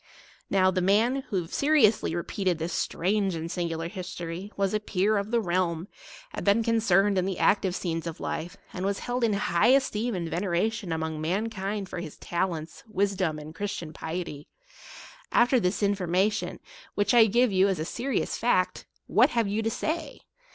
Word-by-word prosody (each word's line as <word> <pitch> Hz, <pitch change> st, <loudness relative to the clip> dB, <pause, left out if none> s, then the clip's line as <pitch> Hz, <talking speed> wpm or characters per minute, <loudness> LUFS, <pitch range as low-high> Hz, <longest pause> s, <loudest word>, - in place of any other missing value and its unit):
Now, 185 Hz, -1 st, +4 dB
the 185 Hz, -, 0 dB
man, 215 Hz, +8 st, +3 dB
who 185 Hz, -6 st, -1 dB
seriously 230 Hz, -, +3 dB
repeated 180 Hz, +1 st, -1 dB
this 165 Hz, +1 st, -3 dB
strange 195 Hz, +1 st, 0 dB
and 165 Hz, +1 st, -4 dB
singular 170 Hz, -2 st, -2 dB
history, 180 Hz, 0 st, -6 dB
was 195 Hz, 0 st, +1 dB
a 215 Hz, -, +2 dB
peer 210 Hz, 0 st, +1 dB
of 200 Hz, 0 st, -1 dB
the 235 Hz, 0 st, +2 dB
realm, 175 Hz, -3 st, -1 dB, 0.5 s
had -, -, -4 dB
been 205 Hz, +3 st, +3 dB
concerned 205 Hz, -4 st, +3 dB
in 180 Hz, -, 0 dB
the 190 Hz, -2 st, -2 dB
active 190 Hz, -3 st, +2 dB
scenes 165 Hz, -3 st, -3 dB
of 165 Hz, -, -6 dB
life, 170 Hz, +2 st, -4 dB, 0.2 s
and 185 Hz, -, -4 dB
was 200 Hz, 0 st, 0 dB
held 245 Hz, 0 st, -2 dB
in 225 Hz, -2 st, +3 dB
high 200 Hz, -3 st, +2 dB
esteem 245 Hz, -4 st, +2 dB
173 -, -, -2 dB, 0.4 s
and -, -, +3 dB
veneration 220 Hz, -3 st, -1 dB
among 160 Hz, -1 st, -2 dB
mankind 195 Hz, +3 st, -2 dB
for 180 Hz, -, -6 dB
his 165 Hz, -4 st, -7 dB
talents, 170 Hz, -3 st, -3 dB
wisdom, 195 Hz, -6 st, 0 dB
and 155 Hz, +1 st, -9 dB
Christian 170 Hz, -3 st, -4 dB
piety. 160 Hz, -3 st, -5 dB, 0.8 s
After 245 Hz, +1 st, +4 dB
this 190 Hz, 0 st, 0 dB
in 200 Hz, 0 st, +3 dB
formation, 195 Hz, +2 st, 0 dB, 0.4 s
which 205 Hz, +3 st, +2 dB
I 230 Hz, -2 st, +7 dB
give 240 Hz, +2 st, +3 dB
you 190 Hz, 0 st, +4 dB
as 190 Hz, -2 st, 0 dB
a 155 Hz, -, -3 dB
serious 255 Hz, +8 st, -2 dB
fact, 185 Hz, -6 st, 0 dB, 0.2 s
what -, -, +4 dB
have 230 Hz, -3 st, +1 dB
you 210 Hz, +2 st, -1 dB
to 225 Hz, -, 0 dB
say 315 Hz, +5 st, -3 dB
195 Hz, 180 wpm, -27 LUFS, 175-215 Hz, 0.8 s, I